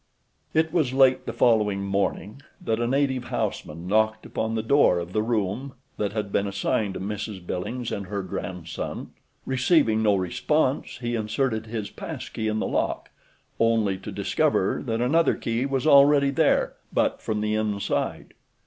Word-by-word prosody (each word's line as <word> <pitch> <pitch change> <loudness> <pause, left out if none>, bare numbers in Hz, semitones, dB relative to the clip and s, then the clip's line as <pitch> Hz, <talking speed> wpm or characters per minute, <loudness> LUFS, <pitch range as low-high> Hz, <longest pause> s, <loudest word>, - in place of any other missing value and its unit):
It 160 0 +2
was 150 -7 +1
late 130 -1 +4
the - - -1
following 105 -4 +2
morning 100 +4 -2 0.2
that 110 0 -1
a 120 - 0
native 130 -1 0
houseman 85 -5 -3
knocked 110 +2 +1
upon 110 0 -2
the 110 - -1
door 130 -6 +4
of 85 +1 -5
the 110 - +2
room 115 +4 -2 0.2
that 105 -1 -1
had 105 -2 -3
been 100 - +1
assigned 100 0 -1
to - - -4
Mrs. 105 -1 -5
Billings 115 +8 -4
and 100 -2 -4
her 100 0 -3
grandson. 90 -3 -5 0.3
Receiving 130 -4 +3
no 105 -2 +4
response 130 - 0
he 120 0 -2
inserted 110 0 -1
his 110 -2 -4
pass - - -7
key 110 - -3
in 110 0 0
the - - -1
lock, - - -2 0.5
only 115 -4 +2
to 95 - -7
discover - - +1
that 115 0 -1
another 160 +7 +3
key 120 +2 -1
was 135 -1 -1
already 140 -1 +6
there, 140 - +2 0.2
but - - 0
from 105 -1 -2
the 105 0 0
inside. 105 -2 -2
110 Hz, 165 wpm, -25 LUFS, 100-130 Hz, 0.5 s, already